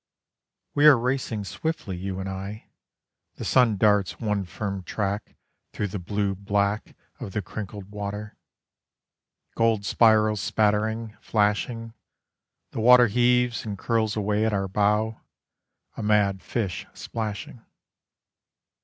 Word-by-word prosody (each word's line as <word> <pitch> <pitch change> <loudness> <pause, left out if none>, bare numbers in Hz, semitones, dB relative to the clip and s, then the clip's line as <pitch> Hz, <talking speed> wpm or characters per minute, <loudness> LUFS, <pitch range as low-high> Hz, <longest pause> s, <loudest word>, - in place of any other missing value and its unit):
We 145 +1 +5
are 145 -4 +9
racing 120 -3 -1
swiftly, 100 - -4
you 95 +1 -4
and 95 - -4
I, 95 +3 -7 0.6
The - - -6
sun 120 -5 +4
darts 105 -2 +2
one 105 -3 -1
firm 100 +3 -4
track 100 +2 -3 0.4
Through 105 - -2
the 100 +1 -4
blue 100 +2 -1
black 100 +2 -1 0.2
Of 95 - -7
the 105 - -2
crinkled 100 +1 -7
water. 105 0 -5 1.2
Gold 115 -3 +1
spirals 110 -2 +4
spattering, 110 +2 0
flashing, 115 +2 0 0.8
The - - -5
water 125 +1 +8
heaves 125 +1 +2
and 105 -3 -5
curls 110 0 0
away 105 0 0
at 110 -1 +1
our 95 -1 0
bow, 105 +3 +1 0.7
A - - -5
mad 105 -2 +2
fish 100 -8 -3
splashing. 110 +1 -5
105 Hz, 120 wpm, -25 LUFS, 100-110 Hz, 1.2 s, are